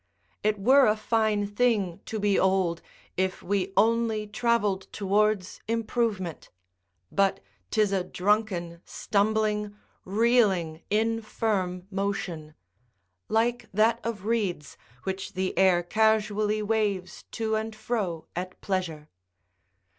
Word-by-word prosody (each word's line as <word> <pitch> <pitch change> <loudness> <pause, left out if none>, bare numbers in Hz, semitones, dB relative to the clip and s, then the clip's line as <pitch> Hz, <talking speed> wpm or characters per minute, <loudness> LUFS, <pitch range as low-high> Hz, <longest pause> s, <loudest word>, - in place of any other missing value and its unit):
It 215 0 +1
were 260 +7 +5
a 210 - +3
fine 215 -2 +1
thing 205 -4 +1
to 220 - -3
be 205 -1 +2
old, 190 -3 +2 0.4
if 185 0 -1
we 195 0 -1
only 225 0 +2
travelled 210 -3 0
towards 205 -1 0
improvement; 225 -6 -2 0.6
but 195 -1 +2 0.3
'tis 210 -2 +2
a 190 -2 +1
drunken, 180 -3 -1
stumbling, 210 0 0 0.3
reeling, 195 -6 +2
infirm 215 -4 -1
motion: 190 -6 -3 0.7
like 235 +2 +1
that 225 +2 +3
of 220 -4 -4
reeds, 200 - -1 0.3
which 190 +1 -4
the 185 0 -2
air 180 -1 +4
casually 215 +1 +1
waves 205 -4 -1
to 220 -1 -1
and 220 0 -2
fro 215 -7 -3
at 185 +1 -5
pleasure. 170 -6 -3
205 Hz, 110 wpm, -27 LUFS, 185-220 Hz, 0.7 s, were